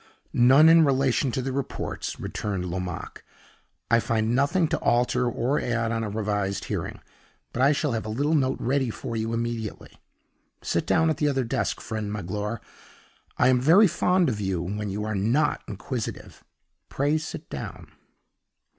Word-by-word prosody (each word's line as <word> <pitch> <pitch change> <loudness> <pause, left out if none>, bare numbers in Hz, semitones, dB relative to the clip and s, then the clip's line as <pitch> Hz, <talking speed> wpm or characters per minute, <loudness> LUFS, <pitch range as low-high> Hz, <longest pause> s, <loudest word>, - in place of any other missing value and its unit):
"None 130 +6 +6
in 165 0 +7
relation 135 -2 +2
to 130 - -2
the 135 - -2
reports," 135 0 -4
returned 100 -4 -3
Lomaque. 90 0 -5 0.7
"I 115 - +6
find 115 0 0
nothing 145 +7 +2
to 160 - 0
alter 125 +1 +2
or 125 +5 0
add 120 -1 -1
on 115 -1 -1
a 110 - -3
revised 105 -2 -2
hearing. - - -4 0.5
But 125 - -2
I 140 +2 +6
shall 150 -1 0
have 110 -1 -3
a - - -4
little 145 +8 0
note 135 -4 +1
ready 130 0 0
for 115 +1 -5
you 110 0 -2
immediately. 115 -2 -4 0.6
Sit - - -1
down 160 0 +3
at - - -2
the 150 - +1
other 135 -2 0
desk, 115 - -1
friend 110 -2 -4
Magloire; 105 +3 -4 0.8
I 125 - +4
am 125 -1 +3
very 170 - +6
fond 180 0 +2
of 110 -5 -2
you 95 -3 -1
when 105 +3 -3
you 105 +2 -3
are 110 - -2
not 120 +10 +1
inquisitive; 110 +3 -6 0.5
pray 145 +3 +1
sit 160 - -7
down." - - -7
120 Hz, 165 wpm, -25 LUFS, 105-140 Hz, 0.8 s, in